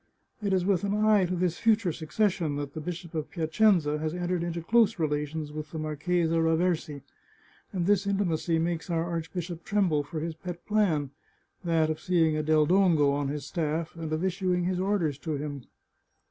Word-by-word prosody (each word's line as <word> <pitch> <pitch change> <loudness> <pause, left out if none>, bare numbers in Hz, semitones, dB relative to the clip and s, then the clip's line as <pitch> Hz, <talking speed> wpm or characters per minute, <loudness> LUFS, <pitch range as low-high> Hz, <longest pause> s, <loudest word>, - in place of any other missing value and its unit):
It 200 -2 -1
is 185 -2 +2
with 195 -2 +2
an 200 0 0
eye 210 -2 +4
to 180 +1 -2
this 175 -1 -1
future 220 -5 +3
succession 170 -1 0
that 145 -1 -4
the 155 - -5
Bishop 175 +1 -6
of 155 -2 -3
Piacenza 160 -2 +2
has 155 +2 -2
entered 180 0 -1
into 170 -1 -3
close 225 +2 +3
relations 150 -1 -2
with 155 0 -6
the 160 - -7
Marchesa 160 +2 0
Raversi, 160 -3 0 0.7
and 180 -3 -1
this 200 0 +2
intimacy 175 -4 0
makes 165 +1 -2
our 165 -1 0
arch 165 -1 -4
bishop 175 -2 -5
tremble 190 -8 +1
for 155 +3 -6
his 165 +1 -3
pet 175 +1 -8
plan 170 -10 +1 0.3
— - - -43
that 165 -2 +2
of 155 - -4
seeing 165 -2 +2
a 155 - 0
Del 155 0 +3
Dongo 170 -5 +4
on 140 0 -1
his 145 0 -3
staflf, 160 +1 -2
and 160 -2 -5
of 155 +4 0
issuing 180 -1 0
his 180 0 -1
orders 185 -7 0
to 160 -1 -3
him." 145 -3 -5
165 Hz, 190 wpm, -28 LUFS, 155-185 Hz, 0.7 s, eye